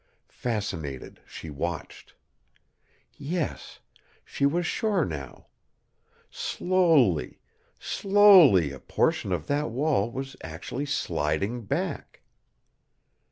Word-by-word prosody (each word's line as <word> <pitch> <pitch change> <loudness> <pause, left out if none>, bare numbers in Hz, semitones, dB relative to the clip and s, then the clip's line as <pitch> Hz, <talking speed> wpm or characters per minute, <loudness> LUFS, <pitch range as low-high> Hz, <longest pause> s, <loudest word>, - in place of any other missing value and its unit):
Fascinated, 95 - -4
she 80 - -9
watched. 80 +3 -6 1.0
Yes, 155 +3 -4 0.4
she 140 - 0
was 170 +4 0
sure 205 - 0
now. 70 -6 -7 0.9
Slowly, 160 - +1 0.4
slowly 190 - +5
a 70 - -9
portion 95 - 0
of 85 -5 -2
that 145 +1 -1
wall 130 -3 0
was 135 +2 -6
actually 85 - -6
sliding 100 - -2
back. - - -4
120 Hz, 85 wpm, -26 LUFS, -, 1.0 s, slowly